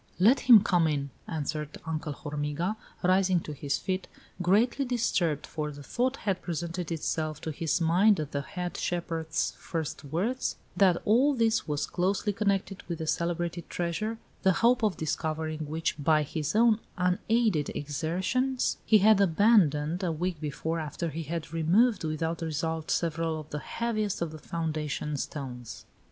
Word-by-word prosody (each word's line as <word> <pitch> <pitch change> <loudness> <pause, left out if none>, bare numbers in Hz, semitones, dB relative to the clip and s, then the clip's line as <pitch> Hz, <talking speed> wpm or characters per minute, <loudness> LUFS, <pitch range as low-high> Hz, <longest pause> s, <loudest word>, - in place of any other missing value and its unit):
"Let 230 +9 +6
him 230 -5 +8
come 175 -6 +3
in," 140 -2 -1 0.2
answered 150 -1 -3
Uncle 160 -1 -3
Hormiga, 150 +7 -3 0.3
rising 185 0 +3
to 150 - -6
his 140 0 -1
feet, 185 0 -3 0.3
greatly 220 +10 +3
disturbed, 195 - 0
for 150 -1 -4
the 145 0 -10
thought 250 - 0
had 195 -3 -2
presented 170 0 -4
itself 155 -1 -2
to 160 - -3
his 160 +2 0
mind 180 +5 +4
at 150 -2 -4
the 140 - -1
head 180 +5 -5
shepherd's 165 -2 -1
first 160 -4 -4
words, 190 - -1 0.2
that 185 -3 +4
all 260 +7 +4
this 225 -4 +2
was 150 -1 -1
closely 195 +3 0
connected 200 -1 -1
with 170 -1 -3
the 160 - -4
celebrated 170 +1 -2
treasure, 180 +6 -2 0.2
the 190 -1 +4
hope 250 +1 +5
of 210 -4 +1
discovering 155 0 -2
which, 160 -1 -2
by 155 0 +4
his 150 +3 -3
own 225 -1 +5 0.2
unaided 180 -1 +1
exertions, 185 - -1
he 220 - +5
had 210 0 +5
abandoned, 175 -4 +3
a 175 - +1
week 165 0 -3
before, 160 +2 -2
after 160 +2 -3
he 160 +2 -4
had 165 0 -5
removed, 185 +8 +3
without 160 +2 -2
result, 160 0 -2
several 165 -1 0
of 155 0 -11
the 150 - -3
heaviest 215 +1 -2
of 170 -2 -2
the 155 - -9
foundation 155 -2 -3
stones. 130 -4 -6
170 Hz, 155 wpm, -29 LUFS, 155-195 Hz, 0.3 s, him